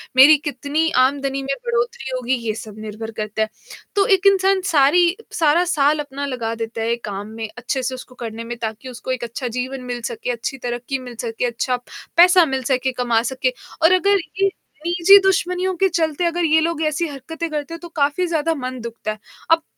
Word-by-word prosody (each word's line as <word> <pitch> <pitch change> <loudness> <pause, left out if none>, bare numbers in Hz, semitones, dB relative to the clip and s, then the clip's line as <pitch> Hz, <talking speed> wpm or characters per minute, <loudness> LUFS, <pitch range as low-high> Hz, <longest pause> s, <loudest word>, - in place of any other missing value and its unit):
मेरी 275 +4 +9
कितनी 290 +5 -1 0.2
आमदनी 275 0 -1
में 275 0 -1
बढोतरी 475 - -1
होगी 255 0 -1
ये 215 - +1
सब 215 -1 -9
निर्भर 220 +1 -6
करता 215 +1 -3
है, 220 - +1 0.5
तो 400 -1 +4
एक 385 0 +4
इंसान 385 0 +4
सारी 335 +5 +5 0.2
सारा 325 +1 +3
साल 295 +1 +3
अपना 285 -1 -4
लगा 240 -5 -3
देता 225 0 -4
है 230 +1 +1
काम 200 +1 -5
में, 220 0 -6
अच्छे 255 +2 -2
से 255 +1 -2
उसको 255 0 -11
करने 230 -1 -6
में 235 +1 -6
ताकि 220 +3 -5
उसको 250 +1 -6
एक 255 -1 -2
अच्छा 235 +2 -4
जीवन 255 +2 -4
मिल 240 0 -4
सके 235 +2 -3
अच्छी 240 +3 -4
तरक्की 245 +3 -3
मिल 250 -2 -9
सके, 230 0 -2
अच्छा 245 +1 -1 0.4
पैसा 355 0 +7
मिल 265 -3 -2
सके, 260 +1 0
कमा 240 -2 +1
सके 255 -1 0 0.3
और 325 - +7
अगर 400 +2 +4 0.2
ये 390 - +5 0.4
निजी 350 +3 +7
दुश्मनियों 370 -1 +1
के 385 - +4
चलते 325 -1 0
अगर 340 0 +1
ये 315 0 +4
लोग 330 -1 -1
ऐसी 315 +3 -1
हरकतें 320 +4 -6
करते 300 +1 -4
हैं, 335 - -6
तो 345 - -8
काफ़ी 290 +4 +1
ज़्यादा 330 -1 0
मन 255 -2 -5
दुखता 230 -2 -5
है। 215 - -8 0.3
अब 330 0 +5
270 Hz, 200 wpm, -21 LUFS, 240-335 Hz, 0.5 s, मेरी